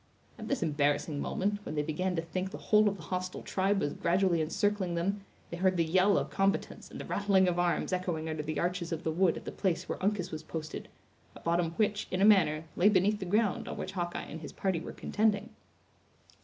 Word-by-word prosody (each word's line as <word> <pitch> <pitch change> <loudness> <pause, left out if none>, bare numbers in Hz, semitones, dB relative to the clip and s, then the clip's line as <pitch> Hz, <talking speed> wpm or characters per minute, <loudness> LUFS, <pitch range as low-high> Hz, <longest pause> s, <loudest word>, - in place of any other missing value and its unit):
At - - -6
this 275 -8 0
embarrassing 145 -1 0
moment, 205 +6 -1
when 155 - -5
they 150 - +1
began 180 +5 -1
to 165 - -1
think 185 +3 -3
the - - -7
whole 210 -1 +4
of 200 - -4
the 165 - -11
hostile 185 0 -4
tribe 195 +1 +1
was 145 - -1
gradually 175 -1 +2
encircling 185 +2 0
them, 195 +4 -1 0.3
they 170 - -4
heard 185 0 +2
the 165 - +3
yell 185 +4 +4
of - - -1
combatants 195 0 -1
and - - -9
the - - -6
rattling 195 -2 +3
of 175 -1 +1
arms 175 +1 +1
echoing 175 -3 -2
under 155 -1 -2
the 155 0 -3
arches 175 -1 -1
of 165 +1 -3
the 160 - 0
wood 175 +1 +2
at - - -9
the - - -4
place 185 -4 -1
where - - -4
Uncas 190 -2 0
was 155 - -5
posted, 160 -1 -6 0.5
a - - -10
bottom 170 0 0
which, 210 +3 0
in 185 - -2
a 195 - +5
manner, 170 -7 +5
lay 195 +4 +5
beneath 205 +1 +3
the 190 - -4
ground 205 +2 +1
on - - -5
which - - -4
Hawkeye 175 -2 -3
and 160 - -8
his 150 - -8
party 190 -4 0
were - - -7
contending. 215 +1 0
180 Hz, 225 wpm, -31 LUFS, 165-195 Hz, 0.5 s, a